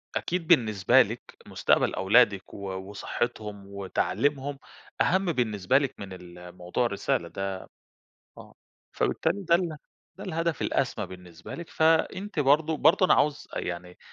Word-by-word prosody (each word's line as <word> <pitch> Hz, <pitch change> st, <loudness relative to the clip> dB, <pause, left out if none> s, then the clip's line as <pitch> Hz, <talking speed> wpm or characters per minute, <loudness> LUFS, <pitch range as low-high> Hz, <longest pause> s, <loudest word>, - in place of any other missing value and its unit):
أكيد 175 Hz, -2 st, -2 dB
بالنسبة 110 Hz, -, +5 dB
لِك -, -, -2 dB, 0.3 s
مستقبَل -, -, +2 dB
أولادِك 100 Hz, -1 st, +3 dB
و -, -, -9 dB, 0.3 s
وصحِّتهم 105 Hz, -1 st, -4 dB
وتعليمهم 135 Hz, +8 st, -1 dB, 0.4 s
أهَم 190 Hz, +2 st, +3 dB
بالنسبة 115 Hz, -, +1 dB
لِك 140 Hz, -2 st, -1 dB
من 95 Hz, -2 st, -7 dB
ال 90 Hz, 0 st, -12 dB
موضوع 90 Hz, +8 st, -1 dB
الرسالة 100 Hz, -5 st, -1 dB
ده، 95 Hz, +1 st, -4 dB, 0.8 s
آه -, -, -13 dB, 0.4 s
فبالتالي 200 Hz, -, 0 dB
ده 170 Hz, -, +6 dB
ال 170 Hz, -3 st, 0 dB, 0.4 s
ده -, -, -7 dB
الهدف 165 Hz, -1 st, -2 dB
الأسمى -, -, -1 dB
بالنسبة 90 Hz, -3 st, -11 dB
لِك 170 Hz, -1 st, -8 dB
فأنتِ 165 Hz, +4 st, +1 dB
برضه 150 Hz, +3 st, +3 dB
برضه 160 Hz, +6 st, +4 dB
أنا -, -, +5 dB
عاوز 150 Hz, 0 st, 0 dB
أ -, -, 0 dB
يعني 90 Hz, 0 st, -5 dB
120 Hz, 135 wpm, -27 LUFS, 95-160 Hz, 0.8 s, ده